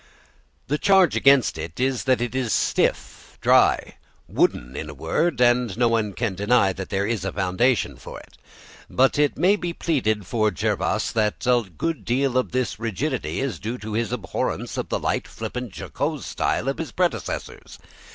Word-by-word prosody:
The 150 Hz, +3 st, -1 dB
charge 190 Hz, -4 st, +4 dB
against 135 Hz, -11 st, +4 dB
it 80 Hz, +4 st, -7 dB
is 130 Hz, -1 st, 0 dB
that 130 Hz, -3 st, +2 dB
it 120 Hz, 0 st, -2 dB
is 130 Hz, -4 st, -1 dB
stiff, -, -, -1 dB
dry -, -, +3 dB, 0.3 s
"wooden" 60 Hz, +2 st, 0 dB
in 80 Hz, -, -5 dB
a 75 Hz, -, -9 dB
word, 125 Hz, -, 0 dB
and 120 Hz, -3 st, +3 dB
no 120 Hz, -1 st, +3 dB
one 110 Hz, -3 st, 0 dB
can 115 Hz, -3 st, -2 dB
deny 100 Hz, 0 st, +2 dB
that 95 Hz, 0 st, -7 dB
there 100 Hz, 0 st, 0 dB
is 110 Hz, -4 st, -2 dB
a 95 Hz, -, -2 dB
foundation 105 Hz, +6 st, +1 dB
for -, -, -9 dB
it. -, -, -18 dB, 0.5 s
But 135 Hz, +2 st, +2 dB
it 145 Hz, -1 st, +2 dB
may 185 Hz, +7 st, +4 dB
be 175 Hz, -3 st, -4 dB
pleaded 110 Hz, -, 0 dB
for 110 Hz, +3 st, +1 dB
Jervas 100 Hz, -, -1 dB
that 105 Hz, -2 st, -1 dB
a 120 Hz, -5 st, +2 dB
good 165 Hz, -3 st, -2 dB
deal 130 Hz, +1 st, 0 dB
of 130 Hz, -, +1 dB
this 125 Hz, -3 st, -1 dB
rigidity 115 Hz, -, -2 dB
is 130 Hz, -11 st, -3 dB
due 115 Hz, +4 st, -4 dB
to 110 Hz, -2 st, -7 dB
his 115 Hz, +1 st, -1 dB
abhorrence 110 Hz, -6 st, -3 dB
of -, -, -4 dB
the -, -, 0 dB
light, -, -, -2 dB
flippant, 125 Hz, -3 st, -6 dB
jocose -, -, -3 dB
style 125 Hz, -, -1 dB
of 135 Hz, -, -1 dB
his 165 Hz, -, -4 dB
predecessors. 145 Hz, -, -3 dB
120 Hz, 180 wpm, -23 LUFS, 105-135 Hz, 0.5 s, charge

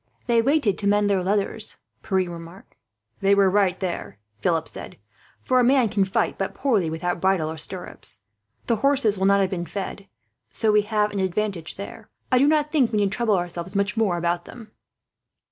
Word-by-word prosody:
"They 235 Hz, -1 st, +3 dB
waited 265 Hz, -5 st, +1 dB
to 200 Hz, -, -1 dB
mend 205 Hz, 0 st, +3 dB
their 190 Hz, -2 st, +2 dB
leathers," 205 Hz, +3 st, -2 dB, 0.3 s
Pierre 190 Hz, -2 st, 0 dB
remarked. 170 Hz, +2 st, -11 dB, 0.4 s
"They 200 Hz, 0 st, +3 dB
were 195 Hz, -1 st, +4 dB
right, 190 Hz, -2 st, +2 dB
there," 180 Hz, -, -4 dB, 0.2 s
Philip 165 Hz, +5 st, 0 dB
said; -, -, -9 dB, 0.5 s
"for 255 Hz, 0 st, +2 dB
a -, -, +4 dB
man 255 Hz, -2 st, +4 dB
can 200 Hz, -1 st, +1 dB
fight 190 Hz, -, -1 dB
but 195 Hz, -, -3 dB
poorly, 220 Hz, -, +1 dB
without 170 Hz, +2 st, -3 dB
bridle 185 Hz, -5 st, +1 dB
or 160 Hz, -, -7 dB
stirrups. 155 Hz, -, -7 dB, 0.4 s
The 230 Hz, -, +1 dB
horses 260 Hz, -5 st, +2 dB
will 190 Hz, -, +2 dB
not 200 Hz, 0 st, +4 dB
have 190 Hz, -, 0 dB
been 175 Hz, -2 st, -3 dB
fed, 195 Hz, +2 st, -6 dB, 0.4 s
so 220 Hz, -2 st, +1 dB
we 210 Hz, 0 st, +5 dB
have 210 Hz, 0 st, 0 dB
an 200 Hz, -, -3 dB
advantage 190 Hz, -2 st, -2 dB
there. 210 Hz, +2 st, -9 dB, 0.2 s
I 255 Hz, -, +5 dB
do 280 Hz, -, +4 dB
not 300 Hz, 0 st, +2 dB
think 275 Hz, -7 st, +2 dB
we 215 Hz, -, 0 dB
need 200 Hz, -2 st, +1 dB
trouble 220 Hz, -2 st, +1 dB
ourselves 175 Hz, +1 st, -4 dB
much 200 Hz, +2 st, 0 dB
more 210 Hz, -6 st, +1 dB
about 175 Hz, 0 st, -1 dB
them." 225 Hz, -3 st, -12 dB
200 Hz, 195 wpm, -24 LUFS, 180-220 Hz, 0.5 s, we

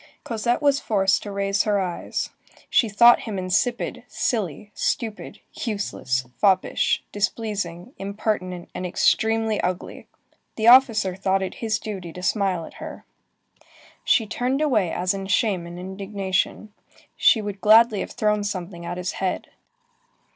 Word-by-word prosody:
Cosette 235 Hz, +4 st, -1 dB
was 280 Hz, -1 st, +4 dB
forced 195 Hz, -5 st, +2 dB
to 205 Hz, -, -7 dB
raise 200 Hz, 0 st, 0 dB
her 205 Hz, -2 st, +1 dB
eyes. 180 Hz, -3 st, -3 dB, 0.4 s
She 230 Hz, -, +3 dB
thought 235 Hz, +4 st, +7 dB
him 205 Hz, -, -3 dB
insipid, 185 Hz, +6 st, -1 dB
silly, 205 Hz, -, -2 dB
stupid, 225 Hz, -3 st, -3 dB
useless, 200 Hz, -, -2 dB
foppish, 190 Hz, -3 st, +2 dB
displeasing, 205 Hz, -1 st, -3 dB
impertinent, 195 Hz, -3 st, -3 dB
and -, -, -5 dB
extremely 220 Hz, +4 st, +1 dB
ugly. 180 Hz, 0 st, -4 dB, 0.5 s
The 220 Hz, -, -2 dB
officer 230 Hz, -6 st, +6 dB
thought 190 Hz, 0 st, 0 dB
it 190 Hz, -, -4 dB
his 220 Hz, -2 st, 0 dB
duty 195 Hz, -6 st, -6 dB
to 180 Hz, -, -9 dB
smile 185 Hz, -4 st, 0 dB
at -, -, -13 dB
her. -, -, -8 dB, 1.0 s
She 225 Hz, -, +3 dB
turned 250 Hz, +5 st, -1 dB
away 225 Hz, -, +2 dB
as 180 Hz, +1 st, 0 dB
in 195 Hz, -1 st, -5 dB
shame 195 Hz, -4 st, +1 dB
and 175 Hz, 0 st, -9 dB
indignation. 195 Hz, +2 st, -3 dB, 0.4 s
She 225 Hz, -, +5 dB
would 205 Hz, -2 st, -5 dB
gladly 220 Hz, +1 st, +6 dB
have -, -, -5 dB
thrown 210 Hz, -3 st, +1 dB
something 185 Hz, -3 st, -5 dB
at 175 Hz, -, -5 dB
his 180 Hz, 0 st, -2 dB
head. 190 Hz, -1 st, -3 dB
200 Hz, 140 wpm, -23 LUFS, 185-220 Hz, 1.0 s, thought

